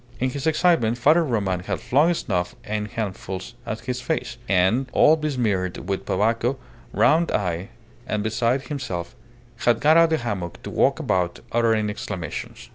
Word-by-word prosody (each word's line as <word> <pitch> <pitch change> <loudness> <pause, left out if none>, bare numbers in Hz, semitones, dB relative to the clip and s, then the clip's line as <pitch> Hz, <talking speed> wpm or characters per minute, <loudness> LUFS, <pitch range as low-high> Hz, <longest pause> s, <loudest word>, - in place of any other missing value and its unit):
In 130 +1 0
his 140 +3 -3
excitement, 155 -8 +3
Father 155 +8 +4
Roman 100 - 0
had 90 - -3
flung 155 +7 +3
snuff 90 - -2
in 105 0 -3
handfuls 95 -2 -5
at 110 +1 -4
his 125 -1 -4
face, 125 -4 -3
and, 100 +8 +2
all 155 - +6
besmeared 115 - -1
with 95 -1 -3
tobacco, 115 +6 +1 0.3
round 165 +2 +3
eyed, 90 0 -1 0.4
and 105 -1 -1
beside 120 +4 0
himself, 95 - -5 0.4
had 120 -2 +2
got 155 +4 +5
out 165 - +7
of - - -1
the 160 - +2
hammock 100 - -4
to - - -6
walk - - +2
about, 90 -2 -1
uttering 115 -2 +2
exclamations. 105 -4 -6
115 Hz, 160 wpm, -23 LUFS, 95-135 Hz, 0.4 s, out